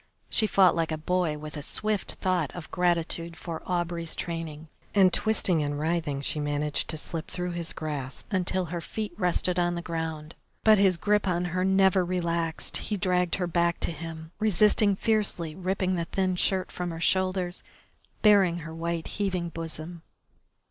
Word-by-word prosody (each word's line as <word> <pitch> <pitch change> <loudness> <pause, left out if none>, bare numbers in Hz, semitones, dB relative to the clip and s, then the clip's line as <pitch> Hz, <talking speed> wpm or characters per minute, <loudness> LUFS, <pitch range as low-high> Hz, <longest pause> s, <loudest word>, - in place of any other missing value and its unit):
She 215 - +2
fought 190 -4 +5
like 165 -1 0
a 155 - -1
boy 165 -1 0
with 150 +1 -8
a 150 - -4
swift 210 +6 0
thought 180 -6 0
of 175 -3 -8
gratitude 170 -1 0
for 165 -2 -6
Aubrey's 175 -2 -2
training, 165 -2 -5 0.3
and 190 -3 +6
twisting 195 -6 +2
and 145 0 -2
writhing 155 -3 -1
she 150 - -1
managed 145 0 -1
to 160 - -3
slip 160 +1 -4
through 180 0 -3
his 170 -1 -3
grasp 145 -4 -5
until 185 0 +1
her 170 - -2
feet 215 +5 -5
rested 180 -1 +1
on 175 0 +1
the 170 - -3
ground. 160 -2 -4 0.3
But 215 -2 +6
his 190 -3 +4
grip 210 +2 +2
on 175 -1 +1
her 185 0 +1
never 190 -1 +4
relaxed; 170 -2 -1
he 210 - -3
dragged 180 -1 +1
her 185 - -1
back 170 0 +1
to - - 0
him, 160 0 -8
resisting 210 0 +4
fiercely, 200 -7 0
ripping 185 +1 -1
the 170 -2 -1
thin 185 +1 0
shirt 185 +1 +1
from 180 -1 -3
her 165 -1 -5
shoulders, 185 0 +1 0.6
baring 195 -5 +5
her 160 - -7
white, 165 0 -3
heaving 185 -4 -2
bosom. 165 +1 -5
175 Hz, 170 wpm, -27 LUFS, 165-185 Hz, 0.6 s, and